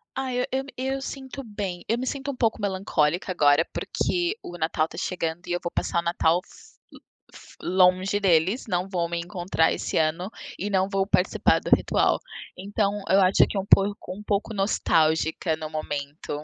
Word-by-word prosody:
Ai, 260 -2 -2
eu - - 0 0.3
eu 265 +1 -1
eu 270 - -5
sinto 270 0 -7
bem, 200 -5 -5
eu 230 - +2
me 255 - -3
sinto 280 +1 -3
um - - -8
pouco 225 -3 0
melancólica 185 -3 0
agora, 145 -1 +4
porque 355 +4 -1
o 175 - -8
Natal 160 0 0
tá 165 - -12
chegando 175 -1 -3
e - - -4
eu 175 - 0
vou 170 - -4
passar 170 - -1
o - - +1
Natal 170 -1 +2 0.6
lo - - -14 0.3
fo - - -15
longe 185 +2 +3
deles, 190 +6 +2
não 180 -1 -1
vão 175 -3 -1
me 170 0 -2
encontrar 175 -2 0
esse - - -3
ano, 165 +5 0 0.3
e 205 +3 -2
não 190 -1 +2
vou 195 -1 +1
participar 185 -2 +3
do - - -5
ritual. - - +1 0.4
Então 205 +1 -1
eu 195 +1 +5
acho 185 +1 +5
que 205 - -4
é - - +2
um 190 - -3
pouco 200 -2 +3
um 210 - -10
pouco 210 +2 -1
nostálgica 160 -4 +1
no 155 -1 -6
momento. 145 -1 -5
185 Hz, 190 wpm, -25 LUFS, 165-205 Hz, 0.6 s, eu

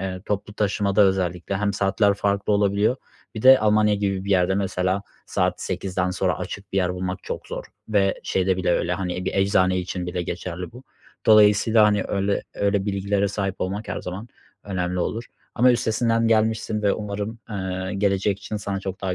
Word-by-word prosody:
eee, 95 -1 -4
toplu 105 0 -3
taşımada 100 -1 +1
özellikle 95 -1 0
hem 100 0 0
saatler 100 +1 +2
farklı 100 +1 0
olabiliyor. 100 +4 +2 0.4
Bir 110 - -5
de 130 0 +9
Almanya 105 0 +3
gibi 100 -2 -1
bir 100 - -4
yerde 95 0 +3
mesela, 95 0 -1 0.2
saat - - 0
8'den 90 -1 -2
sonra - - -1
açık 100 0 -7
bir - - -2
yer 90 -1 0
bulmak 95 +1 -4
çok - - -6
zor. - - -6 0.2
Ve 100 -2 +1
şeyde 95 0 0
bile 90 -1 0
öyle, 85 +1 0
hani, 90 0 -3
bir - - -2
eczane 95 -1 +2
için 90 0 -4
bile 90 0 -2
geçerli 90 +1 -5
bu. 125 +2 -13 0.4
Dolayısıyla, 110 +1 +6
hani, 105 -2 +2
öyle 100 0 0
öyle 100 0 0
bilgilere 100 0 0
sahip 95 -1 -2
olmak 100 +4 -3
her - - -3
zaman 95 +6 -7 0.4
önemli 90 -2 -2
olur. 115 +6 -2 0.3
Ama 125 +1 +5
üstesinden 115 0 +1
gelmişsin 110 -1 +1
ve 100 - +3
umarım, 105 +2 -4
eee, 95 -1 -3
gelecek 100 0 +1
için 110 0 -5
sana 100 -2 -3
çok 95 -1 -6
daha 95 -2 -2
100 Hz, 180 wpm, -23 LUFS, 95-105 Hz, 0.4 s, de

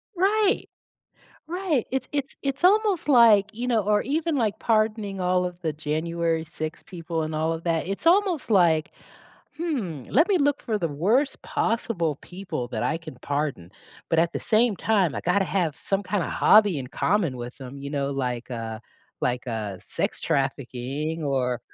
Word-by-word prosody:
Right, 395 +3 +2 0.8
right. 340 - 0
It's 265 - -1
it's 285 -2 -2
it's 275 +4 -3
almost 405 -3 +3
like, 220 -5 +6
you 245 +3 -4
know 230 -3 +2
or 210 0 +2
even 310 +4 0
like 220 -6 0
pardoning 215 -3 0
all 180 0 +1
of 180 0 -6
the 160 -3 -1
January 160 +2 -1
6 155 -1 -6
people 165 -3 -4
and 155 0 -3
all 160 +1 0
of 165 - -6
that, 165 0 0
it's 195 +10 -4
almost 360 - +3
like, 165 -5 +4 0.7
"Hmm, 230 - -3
let 315 +9 +4
me 380 -3 +3
look 285 -1 +2
for 220 -4 -1
the 170 -3 -1
worst 215 - +1
possible 185 - -1
people 180 -9 -5
that 110 -3 -3
I 160 - 0
can 155 -6 -10
pardon, 140 - -2 0.4
but 165 - +1
at 170 +1 +3
the - - -3
same 220 -2 +2
time, 200 -8 +1
I - - -3
gotta 190 +3 +2
have 175 -6 -1
some 195 0 -1
kinda 190 -1 -1
hobby 210 -6 +5
in 130 - -5
common 180 -8 0
with 120 0 -7
them," 135 0 -9
you 140 0 -6
know, 140 -1 -1
like, 125 -3 -3
"Uh 115 -2 -5 0.4
like, 125 +1 -1
uh, 110 -5 -3
sex - - -2
trafficking 140 +2 -2
or 125 -4 0
175 Hz, 175 wpm, -25 LUFS, 145-230 Hz, 0.8 s, like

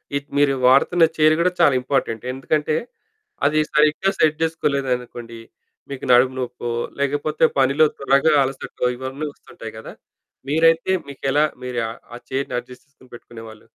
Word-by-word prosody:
ఇ - - +3 0.2
మీరు 145 -1 +3
వాడుతున్న 165 +6 +4
చైర్ 155 0 +5
కూడా 180 - +2
చాలా 145 -5 +5
ఇంపార్టెంట్. 125 -4 -2
ఎందుకంటే 150 +3 -1 0.7
అది 155 +1 +3
సరిగ్గా 155 +5 +3
సెట్ 155 -1 +3
చేసుకోలేదనుకోండి, 125 -7 -3 0.5
మీకు 140 -1 -6
నడుము 130 +1 +4
నొప్పో, 125 -1 -4 0.3
లేకపోతే 145 +2 +1
పనిలో 140 +4 +4
త్వరగా 140 +3 +3
అలసటో 135 -1 -4
ఇవన్నీ 135 +4 -5
వస్తుంటాయి 110 -5 -11
కదా. 110 - -10 0.6
మీరైతే 165 +4 +3
మీకెలా 140 +2 0 0.2
మీరు 125 -1 -3 0.4
ఆ - - -9
చైర్‌ని 135 -1 -2
అడ్జస్ట్ 125 +2 -14
చేసుకొని 130 -3 -22
పెట్టుకునేవాళ్లు? 115 -2 -12
140 Hz, 130 wpm, -21 LUFS, 125-155 Hz, 0.7 s, చైర్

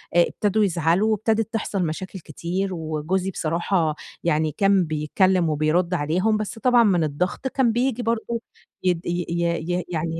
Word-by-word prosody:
آآ 175 - +6
ابتدوا 210 +1 0
يزعلوا، 175 +4 +2
وابتدت 225 +1 0
تحصل 200 -4 -1
مشاكل 185 +4 -5
كتير، 175 +5 -3
وجوزي 165 +4 -2
بصراحة 165 -1 0 0.3
يعني 155 -2 +1
كان 195 -2 +4
بيتكلم 165 +3 +1
وبيرُد 155 +4 +1
عليهم 180 +8 +1
بس 215 +2 -5
طبعًا 245 -1 +5
من 180 -6 +3
الضغط 180 - -2
كان 260 -3 +2
بييجي 245 0 0
برضو 230 +1 -1 0.4
يد 180 -2 0
ي 175 0 -1
ي 170 +1 -1
يعني 165 -1 -2
180 Hz, 145 wpm, -23 LUFS, 165-210 Hz, 0.4 s, آآ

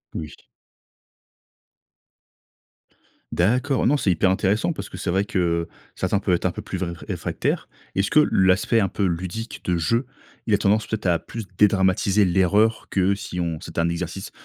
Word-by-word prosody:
Oui. 75 -2 -6 3.0
D'accord. 125 +9 +1
Non, 145 - +3
c'est 105 - 0
hyper 95 +2 +2
intéressant 100 - +1
parce 160 - -6
que - - -11
c'est 95 - -3
vrai 95 +2 +1
que, 100 - -4
heu, 85 -1 0 0.3
certains 95 +2 0
peuvent 90 -2 +1
être - - -4
un 90 - +2
peu - - -7
plus 95 - -5
vré 85 -2 -3 0.2
réfractaires. - - -2 0.3
Est-ce 95 +1 0
que 155 - +6
l'aspect 95 +5 +3
un 100 - +2
peu 100 - -3
ludique 95 +6 -4
de 90 -1 +1
jeu, 115 - +1 0.4
il 110 - 0
a - - +5
tendance 105 +2 +1
peut-être 110 -3 -2
à 85 -2 +3
plus 115 -2 -7
dédramatiser 100 0 +3
l'erreur 95 +5 +2
que 95 +1 +2
si 90 -3 -5
on 85 -2 -2
c'était - - -6
un 85 - +1
exercice 85 +2 -4
95 Hz, 175 wpm, -23 LUFS, 90-105 Hz, 3.0 s, que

